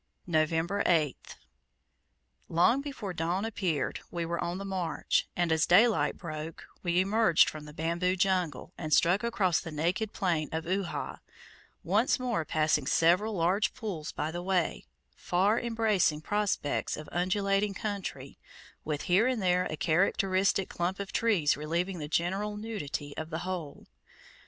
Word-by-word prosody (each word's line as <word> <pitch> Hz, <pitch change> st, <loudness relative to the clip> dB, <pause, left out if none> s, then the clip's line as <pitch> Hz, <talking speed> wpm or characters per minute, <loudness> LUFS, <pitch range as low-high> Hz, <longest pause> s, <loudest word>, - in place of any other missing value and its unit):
November 165 Hz, +4 st, +1 dB
8th. 155 Hz, -6 st, 0 dB, 1.1 s
Long 205 Hz, +11 st, +3 dB
before 265 Hz, -10 st, -5 dB
dawn 175 Hz, +5 st, -1 dB
appeared, 180 Hz, -10 st, -1 dB
we 170 Hz, -1 st, -3 dB
were 170 Hz, +1 st, -2 dB
on 175 Hz, +1 st, -2 dB
the 195 Hz, -, -6 dB
march, 185 Hz, -4 st, -1 dB
and, 175 Hz, -2 st, +1 dB
as 160 Hz, 0 st, +3 dB
daylight 180 Hz, -6 st, +4 dB
broke, 155 Hz, -1 st, -6 dB, 0.2 s
we 175 Hz, 0 st, +1 dB
emerged 195 Hz, -2 st, +4 dB
from 155 Hz, -1 st, -6 dB
the 150 Hz, -, -10 dB
bamboo 170 Hz, +4 st, 0 dB
jungle, 180 Hz, -5 st, 0 dB
and 155 Hz, -3 st, +2 dB
struck 185 Hz, +6 st, +3 dB
across 195 Hz, -7 st, +1 dB
the 165 Hz, -, -7 dB
naked 175 Hz, +7 st, -1 dB
plain 170 Hz, -6 st, -1 dB
of 160 Hz, +1 st, -3 dB
Uhha, 185 Hz, +1 st, -3 dB, 0.6 s
once 210 Hz, +10 st, +2 dB
more 240 Hz, -9 st, -1 dB
passing 155 Hz, -3 st, +1 dB
several 185 Hz, +9 st, +3 dB
large 185 Hz, +5 st, +1 dB
pools 195 Hz, -11 st, -5 dB
by 150 Hz, +2 st, -3 dB
the 175 Hz, +1 st, -4 dB
way 180 Hz, -, -1 dB, 0.3 s
far 195 Hz, +6 st, +1 dB
embracing 220 Hz, -9 st, +1 dB
prospects 205 Hz, -5 st, -1 dB
of 155 Hz, -, -8 dB
undulating 195 Hz, +3 st, +1 dB
country, 190 Hz, -11 st, -5 dB, 0.4 s
with 150 Hz, -2 st, -3 dB
here 190 Hz, +7 st, +3 dB
and 255 Hz, -3 st, 0 dB
there 180 Hz, -1 st, +2 dB
a 155 Hz, -, -4 dB
characteristic 190 Hz, +3 st, +2 dB
clump 180 Hz, +3 st, -2 dB
of 200 Hz, -1 st, -5 dB
trees 200 Hz, -11 st, +2 dB
relieving 170 Hz, +5 st, -2 dB
the 150 Hz, -, -4 dB
general 195 Hz, +6 st, -1 dB
nudity 155 Hz, -10 st, -5 dB
of 160 Hz, 0 st, -5 dB
the 160 Hz, -, -3 dB
whole. 175 Hz, -6 st, -5 dB
180 Hz, 145 wpm, -29 LUFS, 160-200 Hz, 1.1 s, daylight